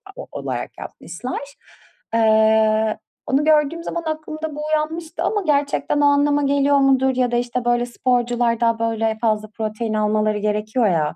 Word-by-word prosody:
o - - -7
o - - -14
olarak - - -4
yapmışlar. 180 +10 -6 0.7
Eee, 220 -1 +3 0.3
onu 275 +2 +2
gördüğüm 310 +2 +2
zaman 340 - -4
aklımda 310 -1 -5
bu 300 - -7
uyanmıştı 315 +2 -2
ama 415 -2 0
gerçekten 290 0 +1
o - - +4
anlama 285 0 +3
geliyor 280 0 +3
mudur 265 -1 +3
ya 250 -1 +1
da, 240 - +1
işte, 245 0 -2
böyle, 240 0 +2
sporcular 240 -1 0
da, 230 -1 +1
böyle, 225 -1 -1
fazla 215 -1 0
protein 220 0 -3
almaları 215 0 +1
gerekiyor 215 +3 0
ya 155 -4 0
240 Hz, 155 wpm, -21 LUFS, 220-285 Hz, 0.7 s, o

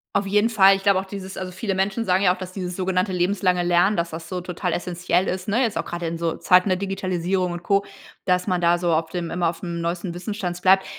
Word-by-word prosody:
Auf 200 0 +1
jeden 205 +3 +3
Fall, 195 -3 +6
ich 195 - -6
glaube 200 -2 +4
auch 190 - -5
dieses 190 -1 -8
also, 185 -1 -5
viele 195 +2 -3
Menschen 195 +4 -1
sagen 185 0 +2
ja 180 - +5
auch, - - -16
dass 185 0 -7
dieses 180 -2 -5
sogenannte 185 +1 0
lebenslange 180 0 +1
Lernen, 175 +4 +3
dass 170 0 -1
das 165 +1 -7
so 185 -1 -3
total 180 0 -3
essenziell 180 +2 0
ist, 185 0 -3
ne? 225 +5 +2
Jetzt 225 -4 -1
auch - - -2
grade 175 0 -5
in 165 0 -3
so 165 -1 -1
Zeiten 180 +2 +4
der 185 - +2
Digitalisierung 185 -1 -1
und 175 0 -6
Co, 200 +2 +2 0.4
dass 180 -1 +2
man 180 -3 0
da 170 0 +4
so 175 -1 0
auf 160 0 0
dem 170 -1 -4
immer 175 -1 +1
aufm 170 0 -5
neuesten 170 +1 -3
Wissensstand 180 -1 -4
bleibt. 190 +1 +5
185 Hz, 250 wpm, -23 LUFS, 175-195 Hz, 0.4 s, Fall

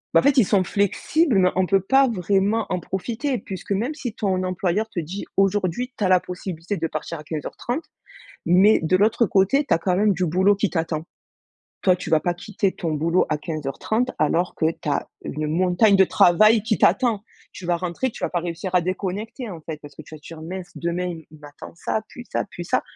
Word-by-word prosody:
Bah - - +7
en - - -8
fait 280 -1 +3
ils 245 - +6
sont 195 -1 +3
flexibles 215 - +1
mais 180 -1 +4
on 185 0 +2
peut 195 +1 +3
pas 270 +8 +4
vraiment 205 +1 +1
en 180 - -1
profiter 235 - -3
puisque 190 -3 -8
même 230 +9 -1
si 255 -7 -5
ton 190 -4 -1
employeur 185 +3 -1
te 185 - -4
dit: 175 +5 -5
«Aujourd'hui 195 +5 +1
tu - - -3
as 190 - +2
la 185 -1 +6
possibilité 180 +1 -5
de 165 - -1
partir 155 +1 -5
à - - -10
15:30,», 205 - -4 0.6
mais 190 +5 +5
de 165 +3 +2
l'autre 215 +3 +3
côté 200 +11 +3
tu - - +3
as - - +4
quand 180 +2 0
même 205 +2 +3
du 180 0 -1
boulot 190 +5 +3
qui 200 0 -1
t'attend. 160 -2 -2 0.8
Toi 185 -1 +3
tu - - -6
vas 160 -1 +3
pas 175 - 0
quitter 195 +2 -2
ton 165 -3 -3
boulot 165 +4 +2
à 155 - 0
15:30 160 - -2
alors 170 +4 +1
que 160 - +1
tu - - -7
as 145 - 0 0.2
une 150 +1 -3
montagne 180 +5 +3
de 190 - +6
travail 215 +6 +5
qui 220 -1 0
t'attend. 210 +2 +2 0.3
Tu 185 - -10
vas 175 0 +1
rentrer, 180 +8 -2
tu - - -10
vas - - +1
pas 175 - -1
réussir 170 +2 -5
à 180 - +5
déconnecter 200 +7 -4
en 175 -4 -7
fait 155 -1 -7
parce 145 -1 -12
que - - -9
tu 155 - -12
vas - - -13
te - - -22
dire: 165 -1 -9
«Mince 180 +2 -7
demain 170 +1 -2 0.2
il 155 -1 -16
m'attend 145 0 -11
ça, 215 +5 -2
puis 245 - -10
ça, - - -1
puis 175 - -7
ça», - - 0
185 Hz, 225 wpm, -23 LUFS, 170-210 Hz, 0.8 s, Bah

